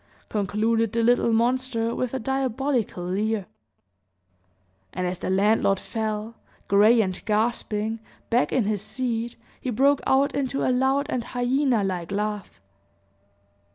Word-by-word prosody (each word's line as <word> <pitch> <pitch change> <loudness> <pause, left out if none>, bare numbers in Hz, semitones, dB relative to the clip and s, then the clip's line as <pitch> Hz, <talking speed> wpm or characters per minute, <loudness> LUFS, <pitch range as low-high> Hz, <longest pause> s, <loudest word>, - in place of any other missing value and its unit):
concluded 220 +2 0
the 230 0 +1
little 240 0 +3
monster, 235 0 +1
with 255 -2 -2
a 265 - -2
diabolical 260 -5 -1
leer. 205 +2 -1 1.5
And 185 - -2
as 180 0 -3
the - - -3
landlord 195 0 +3
fell, 220 0 -3 0.3
gray 215 +4 +5
and 185 -3 -3
gasping, 220 0 -1 0.3
back 245 +2 +2
in 255 - +2
his 205 -1 -1
seat, 235 -2 -3 0.2
he 255 - -4
broke 275 +4 +3
out 275 +2 +3
into 275 -1 -1
a 255 - +3
loud 265 +3 +2
and 250 -5 -1
hyena 245 -1 +1
like 180 -3 -3
laugh. 210 0 -3
225 Hz, 130 wpm, -25 LUFS, 210-255 Hz, 1.5 s, gray